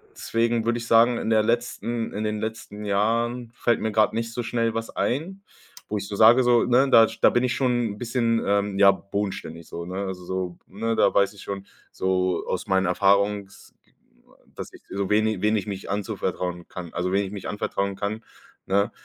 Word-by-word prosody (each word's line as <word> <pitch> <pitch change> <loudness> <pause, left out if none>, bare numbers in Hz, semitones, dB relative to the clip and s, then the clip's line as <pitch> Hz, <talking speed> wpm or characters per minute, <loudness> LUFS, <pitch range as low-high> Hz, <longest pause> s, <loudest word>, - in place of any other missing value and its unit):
deswegen 115 0 0
würde 120 0 +1
ich 115 - -7
sagen, 115 +1 +5
in - - -3
der 110 -1 +4
letzten 120 0 -2
in 105 - -3
den 105 0 -2
letzten 110 -1 -6
Jahren 115 +4 0
fällt 120 -1 +1
mir 110 - -1
gerade 110 0 +2
nicht 115 0 -2
so 120 - -3
schnell 115 -1 -1
was 115 0 -4
ein, 170 +10 -2 0.5
wo 105 - -1
ich 100 - -5
so 100 - -5
sage, 115 +5 +6
so, 120 -1 +4
ne? 125 +3 +3
Da 115 -3 +7
sch 110 - -10
da - - +7
bin 120 - +1
ich 125 0 0
schon 120 -5 0
bisschen, 115 -1 0
ähm, 100 0 0
ja, 100 -1 +8
bodenständig 95 -4 -5
so, 85 0 -7
ne? 95 +2 -4
Also 90 -1 -6
so, 90 -1 -4
ne, 115 +4 -2
da - - +3
weiß 100 0 +3
ich 100 - -13
schon 100 -1 -6 0.3
so 95 -1 0
aus - - -3
meinen 95 0 +2
Erfahrungs 100 +1 +1 0.8
dass - - -7
ich, - - -15
so 100 -1 -3
wen 105 +1 +3
i 110 -4 -2
wen 105 +1 +2
ich 100 - -3
mich 100 -1 -6
anzuvertrauen 90 -3 -3
kann, 85 -3 -8
also 90 +1 -2
wen 100 +1 +1
ich 95 - -7
mich 100 -2 -6
anvertrauen 100 -1 -2
kann, 105 +3 -4 0.4
ne? 100 +3 +2
105 Hz, 205 wpm, -24 LUFS, 100-115 Hz, 0.8 s, ja